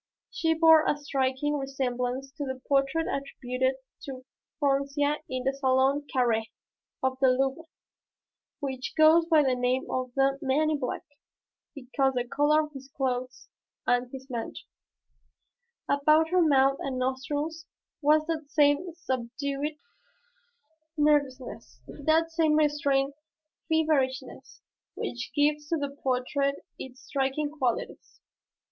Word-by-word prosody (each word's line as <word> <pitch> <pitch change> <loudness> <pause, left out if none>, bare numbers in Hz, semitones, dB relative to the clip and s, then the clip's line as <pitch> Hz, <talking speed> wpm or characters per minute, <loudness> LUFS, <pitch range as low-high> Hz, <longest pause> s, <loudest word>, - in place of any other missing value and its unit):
She 325 -1 +1
bore 320 -1 +7
a 295 - +2
striking 285 0 -1
resemblance 265 -1 -3
to 290 +1 -6
the 260 -2 -4
portrait 275 +4 +2
attributed 260 -1 -2 0.3
to 260 -2 -8 0.3
Froncia 285 +1 +1
in 255 -1 -3
the 270 +1 +1
Salon 270 +1 +2
Carré 230 -4 +1 0.5
of 260 0 0
the 265 - +6
Louvre 270 +5 +1 1.0
which 265 -2 -4
goes 320 +2 +6
by 315 -3 +5
the 265 -2 +2
name 250 +1 0
of 255 -1 -2
the 275 0 +2
"Man 300 +3 +2
in 300 - 0
Black," 250 - -3 0.7
because 270 0 0
the 245 -1 -1
color 295 +4 +3
of 305 - -8
his 270 -2 -10
clothes 255 -1 -2 0.4
and 245 0 +1
his 265 0 -9
mantle. 235 -4 -5 1.2
About 305 +3 +3
her 365 +1 +3
mouth 275 -3 +4
and 265 -2 -3
nostrils 290 +5 -3 0.3
was 305 +1 +4
that 315 -3 -4
same 295 +4 +2
subdued 280 +1 -3 1.2
nervousness, 265 - 0
that 315 +3 +1
same 320 -2 +2
restrained 285 -2 +2 0.6
feverishness 305 -5 -1 0.3
which 245 +1 -5
gives 295 0 +2
to 330 - +1
the 285 -2 -3
portrait 275 +2 0 0.2
its 260 +1 -9
striking 280 +2 -1
qualities. 260 -6 -3
275 Hz, 125 wpm, -28 LUFS, 260-300 Hz, 1.2 s, bore